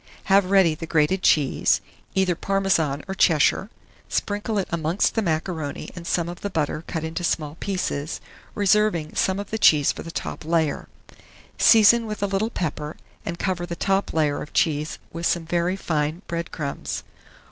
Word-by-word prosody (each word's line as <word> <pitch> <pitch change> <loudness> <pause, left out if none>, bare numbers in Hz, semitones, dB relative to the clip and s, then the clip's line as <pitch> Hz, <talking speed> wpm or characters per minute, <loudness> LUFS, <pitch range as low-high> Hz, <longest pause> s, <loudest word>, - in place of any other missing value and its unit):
Have 195 -2 +5
ready 190 -5 +5
the 160 +1 -7
grated 160 +4 +2
cheese, 145 -7 +3 0.4
either 190 -2 +3
Parmesan 170 -6 0
or 190 - -3
Cheshire; 175 +3 +3 0.4
sprinkle 205 +1 -1
it 195 - 0
amongst 170 +3 +1
the 225 - +1
macaroni 160 -4 -3
and 170 -1 -8
some 170 -1 0
of 175 +1 -7
the 205 - -3
butter 155 -3 -2
cut 160 -2 -3
into 160 +2 -4
small 155 -3 -1
pieces, 180 -6 -2 0.4
reserving 205 -6 +2
some 190 +1 +1
of 205 - -7
the 220 - -2
cheese 150 -7 +5
for - - -8
the 165 - -8
top 165 - -5
layer. 160 -2 0 0.7
Season 225 +1 +6
with 210 -1 -4
a - - +4
little 200 +3 0
pepper, 150 -6 -4 0.3
and 170 - -3
cover 175 -1 -2
the 170 - -4
top 195 +2 0
layer 150 -3 +1
of 150 - -9
cheese 155 -1 +1 0.2
with 170 +1 -1
some 170 -2 0
very 175 +2 0
fine 160 -1 -2
bread 170 0 -4
crumbs. 140 -3 -4
170 Hz, 170 wpm, -24 LUFS, 155-195 Hz, 0.7 s, Season